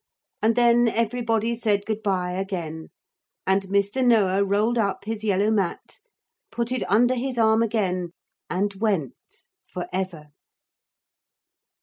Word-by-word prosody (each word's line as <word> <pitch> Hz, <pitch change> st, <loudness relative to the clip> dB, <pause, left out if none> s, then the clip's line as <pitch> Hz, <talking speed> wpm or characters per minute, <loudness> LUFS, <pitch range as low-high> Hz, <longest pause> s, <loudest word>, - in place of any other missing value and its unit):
And 225 Hz, +1 st, +3 dB
then 240 Hz, 0 st, +4 dB
everybody 230 Hz, 0 st, 0 dB
said 210 Hz, -3 st, 0 dB
good 220 Hz, -1 st, -3 dB
bye 185 Hz, -4 st, -1 dB
again, 175 Hz, -4 st, -4 dB, 0.6 s
and 195 Hz, 0 st, +1 dB
Mr. 200 Hz, +6 st, +1 dB
Noah 200 Hz, -5 st, +3 dB
rolled 210 Hz, +4 st, +1 dB
up 200 Hz, -2 st, -1 dB
his 220 Hz, 0 st, -4 dB
yellow 205 Hz, 0 st, +2 dB
mat, 195 Hz, -5 st, -2 dB, 0.5 s
put 235 Hz, 0 st, -2 dB
it 255 Hz, -, -1 dB
under 240 Hz, +5 st, +4 dB
his 255 Hz, 0 st, -3 dB
arm 220 Hz, 0 st, +4 dB
again, 185 Hz, -6 st, -1 dB, 0.4 s
and 200 Hz, +3 st, -1 dB
went 200 Hz, -, -3 dB, 0.2 s
for 180 Hz, -, -5 dB
ever. 180 Hz, -5 st, -4 dB
210 Hz, 125 wpm, -24 LUFS, 190-230 Hz, 0.6 s, then